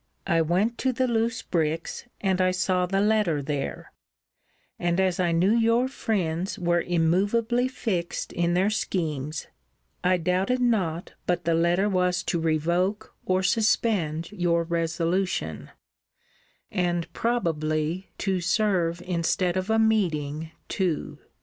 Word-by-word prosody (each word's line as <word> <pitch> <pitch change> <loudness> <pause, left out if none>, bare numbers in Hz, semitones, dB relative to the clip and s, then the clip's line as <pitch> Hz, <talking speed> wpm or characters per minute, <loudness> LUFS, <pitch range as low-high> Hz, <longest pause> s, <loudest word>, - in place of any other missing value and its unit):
I 165 -1 +2
went 190 +9 +1
to 260 - +1
the 255 +1 0
loose 230 0 0
bricks, 165 +2 -2 0.2
and 190 -2 +1
I 185 - +4
saw 185 0 +1
the 195 +2 +1
letter 210 -7 +2
there: 145 -1 -4 0.9
and 175 +1 0
as 185 -2 +1
I 175 -2 +2
knew 175 +4 +3
your 230 +2 +3
friends 190 -8 -2
were 175 -1 +1
immovably 200 +9 +1
fixed 200 -9 -3
in 175 0 +1
their 190 +4 +2
schemes, 155 -7 -2 0.6
I 180 0 +3
doubted 185 +8 0
not 190 -9 0
but 175 -2 0
the 165 - +2
letter 170 +4 +2
was 180 -2 +1
to 170 - -1
revoke 175 +6 0
or 185 0 +2
suspend 190 -7 +1
your 175 -4 +1
resolution; 165 - -1 1.0
and 175 -2 0
probably 165 -6 -1
to 190 -2 -1
serve 175 -3 +1
instead 175 0 0
of 185 +2 -2
a 220 - +3
meeting 160 -9 +1 0.2
too. 180 -6 -2
180 Hz, 130 wpm, -26 LUFS, 165-205 Hz, 1.0 s, I